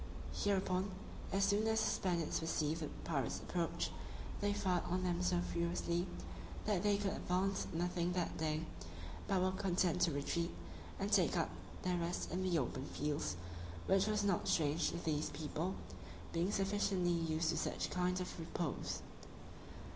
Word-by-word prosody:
Hereupon, 190 -1 +1 0.4
as 195 +1 +3
soon 205 +2 +3
as 220 0 +3
the - - +3
Spaniards 170 -4 +1
perceived 160 0 0
the 155 - -1 0.2
pirates 135 -7 0
approach, 170 -2 -1 0.5
they 205 0 +2
fired 185 -3 +1
on 185 +1 0
them 175 -1 +1
so 180 -1 +3
furiously, 170 +1 0 0.6
that 205 -4 +2
they 205 0 +4
could 200 -1 0
advance 190 +1 +1
nothing 175 +1 0
that 175 -2 0
day, 155 0 0 0.6
but 195 - +3
were 185 - +3
content 180 -2 +2
to 170 - +5
retreat, 170 +4 0 0.5
and - - -1
take - - +4
up - - +1 0.3
their 180 -1 +2
rest 170 +1 -1
in 180 +3 0
the 185 -2 +2
open 130 -1 -1
fields, 150 - -1 0.5
which 195 +1 +4
was 215 -1 +2
not 195 -4 +2
strange 155 -1 +3
to - - -3
these 155 -2 0
people, 155 +5 -2 0.6
being 170 +4 +2
sufficiently 195 -3 +2
used 165 -1 +1
to 165 - +1
such - - -1
kind 180 0 +1
of 180 -1 -4
repose. 165 -1 -2
175 Hz, 155 wpm, -38 LUFS, 165-190 Hz, 0.6 s, to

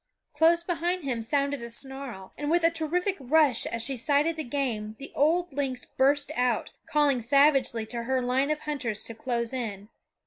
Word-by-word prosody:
Close 330 +3 +4
behind 350 0 -1
him 250 -4 -2
sounded 280 +3 0
a 235 - -6
snarl, 260 -5 -8
and 295 0 -3
with 340 +1 +2
a 330 - +5
terrific 345 +4 -1
rush 275 -2 +3
as 230 0 -2
she 270 +3 -1
sighted 290 +6 +1
the 315 - -3
game 235 -6 -2
the 275 - -9
old 335 +3 +2
lynx 265 -3 -2
burst 285 +2 +1
out, 245 -2 0 0.2
calling 290 -4 +2
savagely 270 -2 +3
to 235 +1 -5
her 260 +1 +1
line 255 +3 +1
of 305 0 -1
hunters 255 -8 -3
to 230 - -5
close 235 +1 -2
in. 210 -5 -4
275 Hz, 180 wpm, -27 LUFS, 235-300 Hz, 0.2 s, a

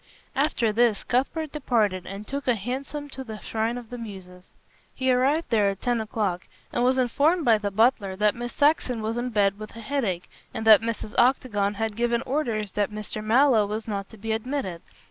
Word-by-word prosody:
After 270 -6 +1
this 230 -2 +2
Cuthbert 280 +5 -1
departed 215 - 0
and 200 +2 -7
took 280 +2 -5
a 245 - +4
hansom 270 +7 -5
to 265 -1 -7
the 220 -4 -8
"Shrine 225 +2 -2
of 240 -2 -10
the 245 - -6
Muses." 185 -5 -10 0.4
He 260 -1 +1
arrived 275 +6 +1
there 210 -3 +4
at 195 -1 -4
ten 240 -2 +1
o'clock, 210 -5 -2 0.3
and 240 - +1
was 255 +1 +3
informed 290 +7 +2
by 225 -3 +5
the 205 -1 -2
butler 205 -2 +2
that 210 +1 +2
Miss 240 0 -5
Saxon 275 -6 +2
was 225 +2 -2
in 250 +1 -2
bed 200 -3 +1
with 215 0 -9
a - - -8
headache, 220 -8 -2 0.3
and 220 - -3
that 220 -1 +8
Mrs. 225 -2 -4
Octagon 225 -5 +2
had 220 0 -2
given 235 +1 0
orders 230 -8 -1
that 205 0 0
Mr. 215 0 -5
Mallow 230 -1 +4
was 215 +2 -4
not 200 -2 -4
to 220 - -14
be 220 +2 -4
admitted. 220 -6 -3
225 Hz, 200 wpm, -25 LUFS, 210-255 Hz, 0.4 s, that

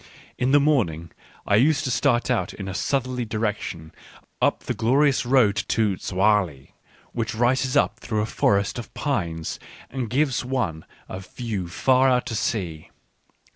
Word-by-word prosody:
In 125 - 0
the 145 +2 +6
morning 95 - +1 0.3
I 100 - +3
used 140 +4 +3
to 130 - -1
start 125 -1 +1
out 120 - -1
in 95 - -7
a 95 - -4
southerly 130 +2 -1
direction 105 -8 -3 0.5
up - - +1
the - - -2
glorious 135 +2 +2
road 120 -6 +4
to 105 -3 +1
Zoagli, 95 -8 0 0.4
which 110 -1 -3
rises 125 +3 +2
up - - +1
through 110 -3 -2
a - - 0
forest 100 0 +1
of 115 - -9
pines 85 - -2 0.3
and 125 -4 -3
gives 135 +1 +1
one 120 -12 -2 0.2
a 95 - -6
view 100 -1 -5
far 130 +8 +3
out 125 -1 +2
to 115 - -4
sea. 90 -8 -3
115 Hz, 155 wpm, -24 LUFS, 95-130 Hz, 0.5 s, the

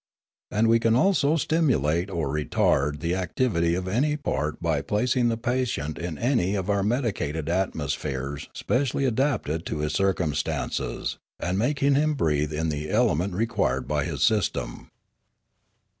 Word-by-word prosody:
And 110 +2 +2
we 115 +1 +5
can 115 0 +3
also 155 0 +3
stimulate 100 - +1
or 85 -6 -2
retard 75 0 +1
the 85 +1 0
activity 90 -2 0
of 90 +1 -3
any 140 +10 +1
part 75 - -2
by 80 -4 0
placing 120 - +1
the 115 - -1
patient 120 - -2
in 85 -2 -4
any 115 - +1
of 95 +1 -1
our 100 -1 +1
medicated 100 - -1
atmospheres 75 -6 -2
specially 135 +1 0
adapted 120 - 0
to - - -3
his 75 0 -1
circumstances, 90 -5 -1 0.2
and 90 +1 -1
making 140 +4 +2
him 150 +2 +2
breathe 75 - 0
in 80 +1 -1
the 75 0 -3
element 100 -5 +1
required 115 +4 0
by - - 0
his - - -2
system. 105 - 0
95 Hz, 145 wpm, -25 LUFS, 80-125 Hz, 0.2 s, we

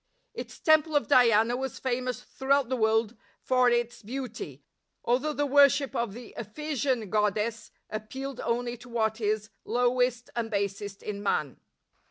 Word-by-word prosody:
Its - - -8
temple 315 -1 +4
of 290 - +2
Diana 235 -4 +5
was 265 +1 -4
famous 250 -1 -2
throughout 270 -1 +1
the 260 - +1
world 220 0 +2 0.2
for 255 -1 +3
its 240 0 0
beauty, 255 +4 -6 0.4
although 260 +6 +1
the 290 -1 0
worship 280 -1 +4
of 235 -4 -1
the 240 -1 -10
Ephesian 255 -1 -2
god 210 -1 +2
dess 220 +1 -3 0.2
appealed 265 +5 -6
only 240 +1 -1
to 245 +1 -14
what 220 -1 0
is 215 0 -1
lowest 245 +1 +1
and 230 -1 -2
basest 200 -1 -3
in 205 -1 -4
man. 150 -8 -1
240 Hz, 150 wpm, -28 LUFS, 220-265 Hz, 0.4 s, Diana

